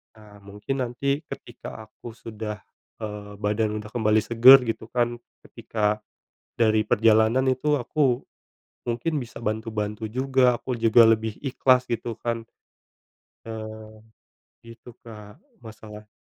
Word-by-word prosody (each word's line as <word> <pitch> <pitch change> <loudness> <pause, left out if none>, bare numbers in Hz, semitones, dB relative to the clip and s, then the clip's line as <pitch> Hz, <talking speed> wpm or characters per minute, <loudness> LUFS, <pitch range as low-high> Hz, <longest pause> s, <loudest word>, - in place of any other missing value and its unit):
Nah, 105 -2 -16
mungkin 105 +7 -5
nanti 140 +4 -1
ketika 110 - -9
aku 110 - -14
sudah, 110 -1 -6 0.4
eee, 105 -1 -6
badan 105 +1 -1
udah 105 0 -8
kembali 110 -2 +2
segar 120 +3 +9
gitu 115 -1 -4
kan. 120 -1 -1 0.2
Ketika 105 -1 -2 0.6
dari 110 -1 +3
perjalanan 110 +3 +3
itu 145 +3 +1
aku 130 -1 +1 0.7
mungkin 140 +6 -1
bisa 120 -1 -9
bantu-bantu 110 0 -3
juga. 130 +1 +2
Aku 130 - -5
juga 115 +1 +6
lebih 110 -1 +2
ikhlas 130 -1 +3
gitu 115 -1 -3
kan. 115 -1 -2 1.0
Eee, 110 0 -9 0.6
gitu 115 0 -13
Kak, 105 -2 -11 0.2
masalah 105 -2 -12
110 Hz, 120 wpm, -25 LUFS, 110-120 Hz, 1.0 s, segar